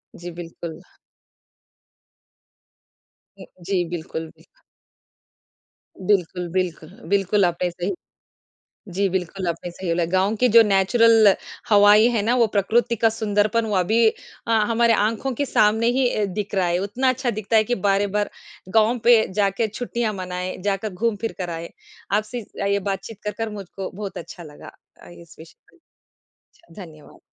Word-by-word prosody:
जी, 175 +1 -8
बिल्कुल। 165 -1 -8 2.6
उम, - - -10 0.2
जी, 185 -1 0
बिल्कुल, 165 -1 -5
बिल्क - - -26 1.4
बिल्कुल, 180 -2 0
बिल्क 180 -3 -2 0.3
बिल्कुल 200 0 +2
आपने 175 +1 -1
सही 175 +3 -3 1.0
जी, 195 +2 +1
बिल्कुल 185 0 -3
आपने 170 +1 -3
सही 185 +2 -8
बोला। 170 0 +1
गाँव 190 +3 +2
की 250 +4 +3
जो 230 +1 +8
नेचुरल 215 +1 +5 0.4
हवाएँ 210 +1 +6
है 230 -3 0
ना, 230 +4 +1
वो 235 -2 +4
प्रकृति 220 +3 +1
का 225 +1 +3
सुंदरपन 215 0 0
वो 210 -2 -2
अभी 220 +6 +3 0.4
अ, - - 0 0.2
हमारे 235 0 +3
आँखों 225 +5 0
के 285 +4 -2
सामने 220 -2 +2
ही 265 -2 +3
अ, 215 - 0
दिख 200 +1 -4
रहा 185 -2 +2
है, 175 +1 0
उतना 220 +7 0
अच्छा 255 0 -1
दिखता 215 +1 -2
है 215 - +5
कि 245 +3 -1
बार-बार 205 +1 +1 0.4
गाँव 225 +2 +3
पे 235 -2 +5
जाके 200 +2 +1
छुट्टियाँ 235 +1 -3
मनाएँ, 180 -1 -5
जाकर 200 +2 -1
घूम 225 +4 0
फिर 225 - -3
कर 180 -3 -4
आए। 165 0 -6 0.4
आपसे 215 +4 -1 0.2
अ, - - -1
ये 200 0 +1
बातचीत 195 +2 -5
कर 210 - -2
कर 225 -1 -2
मुझको 195 -2 -7
बहुत 200 +1 -7
अच्छा 175 - -9
लगा 150 -2 -12 0.3
अ, - - -14
इस 170 -2 -15
विषय 160 0 -14 0.2
पर। - - -25 0.8
छा 340 - -23
धन्यवाद। 155 -3 -15
205 Hz, 155 wpm, -22 LUFS, 180-225 Hz, 2.6 s, जो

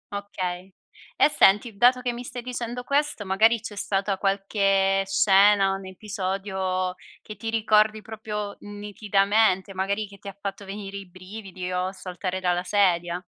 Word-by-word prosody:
Okay. 185 -2 -5 0.5
E - - +6
senti, 220 -4 +4
dato 250 +4 +4
che 245 -1 -1
mi 245 +1 -6
stai 245 -1 -7
dicendo 245 0 -4
questo, 280 -5 0
magari 220 +4 +4
c'è 215 -1 -8
stata 195 -1 -1
qualche 195 -1 +2
scena, 195 0 +5
un 195 -1 -6
episodio 190 -2 -3 0.3
che 215 - -9
ti 225 - -5
ricordi 215 -1 +3
proprio 210 -2 -5
nitidamente, 205 -1 +1
magari 200 +3 -1
che 200 0 -15
ti 200 - -12
ha 195 0 -8
fatto 200 0 -5
venire 200 0 -7
i 195 -2 -9
brividi 185 0 -8
o 180 +1 -1
saltare 185 0 -5
dalla 180 -1 0
sedia? 175 -3 +1
200 Hz, 150 wpm, -25 LUFS, 190-215 Hz, 0.5 s, E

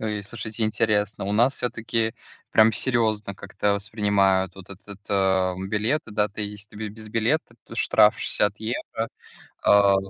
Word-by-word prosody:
Ой. 105 -2 -3
Слушайте, 110 +1 -6
интересно, 105 -2 0
у 100 - -2
нас 120 +5 +3
всё-таки 115 -1 -1 0.4
прямо 110 0 +5
серьезно 110 -6 +1
как-то 100 +1 -1
воспринимают 100 -2 +1
вот 95 0 -13
этот, 100 +1 -11
э, 95 -2 +2
билеты, 110 +6 -1
да, 105 0 +1
ты, 105 +1 -5
если 105 0 -7
ты 110 0 -4
без 110 +1 -8
билета, 115 +5 0
то - - -11
штраф - - +4
60 105 0 +1
евро. 115 0 -3 0.6
А. 100 -1 +5
105 Hz, 150 wpm, -24 LUFS, 100-110 Hz, 0.6 s, прямо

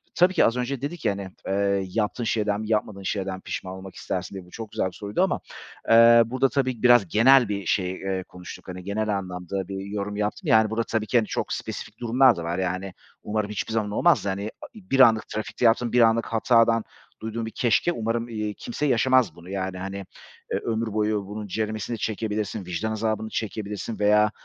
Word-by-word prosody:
Tabii 180 +1 +4
ki - - +4
az 115 - +1
önce 125 +1 -2
dedik 150 +4 -5
ya - - +4
hani, 100 -1 -6 0.2
eee, 100 0 +1
yaptığın 110 +4 -1
şeyden 105 -2 0
mi 110 - -6
yapmadığın 105 -2 -1
şeyden 95 -1 -2
mi 95 - -11
pişman 95 - -5
olmak 95 0 -10
istersin 95 +1 -4
diye 95 -2 -7
bu 90 - -19
çok 110 0 -8
güzel 95 - 0
bir - - -6
soruydu 100 0 -1
ama, - - 0 0.5
eee, 115 +1 +8
burada 130 +3 +1
tabii 130 -4 -1
biraz 120 -5 +6
genel 120 +5 +5
bir 100 -2 -3
şey, 90 +1 +1
eee, 95 0 -3
konuştuk, 90 0 -11
hani 90 0 -7
genel 105 +1 -1
anlamda 90 0 -5
bir 95 0 -5
yorum 100 0 -4
yaptım, 105 0 -2
yani 110 -1 +5
burada 110 +2 0
tabii 110 -1 -2
ki 120 - +3
hani 110 -2 +2
çok - - -2
spesifik 110 +1 -6
durumlar 125 +1 +4
da 85 - -5
var. 85 +1 -2
Yani 95 +1 -2 0.3
umarım 105 -1 -2
hiçbir 105 +2 -3
zaman 110 -2 0
olmaz 105 - +3
da - - 0
hani 100 +3 -3 0.2
bir 185 -11 -2
anlık 115 -4 +6
trafikte 110 +3 -3
yaptığın 115 +1 +3
bir 125 - +5
anlık 115 0 +4
hatadan 115 0 +3 0.4
duyduğun 110 +1 -4
bir 110 - -6
keşke 120 +8 +2
umarım, 115 -4 -2
eee, 105 -2 -3
kimse 225 - -4
yaşamaz 130 - +3
bunu 85 +1 -13
yani 95 -1 -3
hani, 95 +1 -5 0.5
eee, - - +1
ömür 115 -1 -2
boyu 105 -1 0
bunun 105 +1 -6
ceremesini 110 +3 -3
çekebilirsin, 105 -2 -3
vicdan 90 +5 -3
azabını 110 0 -2
çekebilirsin 110 0 -4
veya, 105 0 +4
110 Hz, 205 wpm, -25 LUFS, 100-115 Hz, 0.5 s, eee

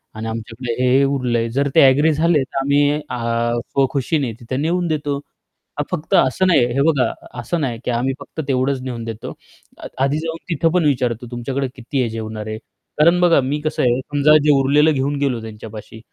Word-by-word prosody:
आणि 110 +1 -5
आमच्याकडे 115 +2 -5
हे-हे 130 +2 +4
उरलंय." 125 -4 0
जर 140 +4 0
ते - - +7
ॲग्री 145 +4 +5
झाले 160 -1 +2
तर 130 - -8
आम्ही 145 +1 +3 0.2
अ, 120 0 -1
स्वखुशीने 135 -1 -1
तिथे 130 +3 -4
नेऊन 170 +4 0
देतो. 145 -2 -1 0.6
हां, - - +1
फक्त 165 -3 -4
असं 160 +9 +3
नाही. 165 -9 +4
हे 140 - +1
बघा, 140 -5 +2 0.3
असं 160 +8 -2
नाही 120 -5 -2
की - - 0
आम्ही 125 +3 0
फक्त 160 - -7
तेवढंच 130 0 0
नेऊन 120 -3 -5
देतो. 115 -2 -6 0.4
अ - - -8 0.2
आधी 140 +2 +1
जाऊन 165 0 -4
तिथं 165 0 +1
पण 175 -4 +2
विचारतो, 125 -4 0
"तुमच्याकडे 130 +3 -3
किती 130 +2 -3
आहे 120 - 0
जेवणारे?" 110 -1 -5 0.4
कारण 170 +3 +5
बघा 170 -5 +5
मी 140 +3 -2
कसं 155 - -2
आहे, 125 +1 +2
समजा 145 +3 +4
जे 150 - +4
उरलेलं 150 +3 +4
घेऊन 140 +1 -1
गेलो 130 -5 0
त्यांच्यापाशी 110 0 -10
135 Hz, 185 wpm, -19 LUFS, 120-150 Hz, 0.6 s, ते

